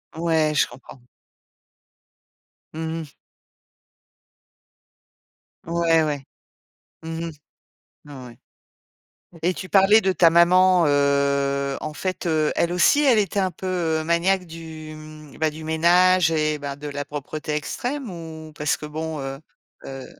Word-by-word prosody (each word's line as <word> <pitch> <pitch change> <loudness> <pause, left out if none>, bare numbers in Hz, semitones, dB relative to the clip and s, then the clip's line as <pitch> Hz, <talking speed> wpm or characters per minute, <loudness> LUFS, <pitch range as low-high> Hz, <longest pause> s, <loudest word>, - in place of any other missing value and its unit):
Ouais, 160 -2 +1
je - - +3
comprends. 125 +1 -14 1.7
Mmh 160 +1 -4
mh. 155 - -9 2.6
Ouais, 165 -1 +2
ouais. 145 -3 -2 0.8
Mmh 165 +1 -4
mh. - - -6 0.7
Non, 135 -4 -10
ouais, 120 - -14 1.0
et 180 +2 +1
tu 185 - -7
parlais 200 +3 +6
de 190 - +1
ta 175 -2 +5
maman, 180 +1 +5
heu, 140 -1 +1
en 155 - -5
fait, 185 0 -3
heu, 155 -2 +1
elle 170 - +1
aussi, 180 +11 +4
elle 260 -5 +5
était 200 -1 0
un 190 -1 +1
peu, 175 - -10 0.4
heu, - - -5
maniaque 180 +3 +1
du, 160 -2 -9
mmh 155 -2 -13
bah, 155 0 +2
du 155 +1 -10
ménage 175 +2 +4
et 155 -1 0
bah, 140 -1 -5
de 145 +1 -8
la 145 0 -4
propreté 150 +2 -5
extrême 245 - -4
ou 160 -2 -9
parce 150 -1 0
que, - - -8
bon, 155 +1 -5
heu 135 0 -5 0.5
heu, 135 -1 -8
160 Hz, 135 wpm, -23 LUFS, 150-175 Hz, 2.6 s, parlais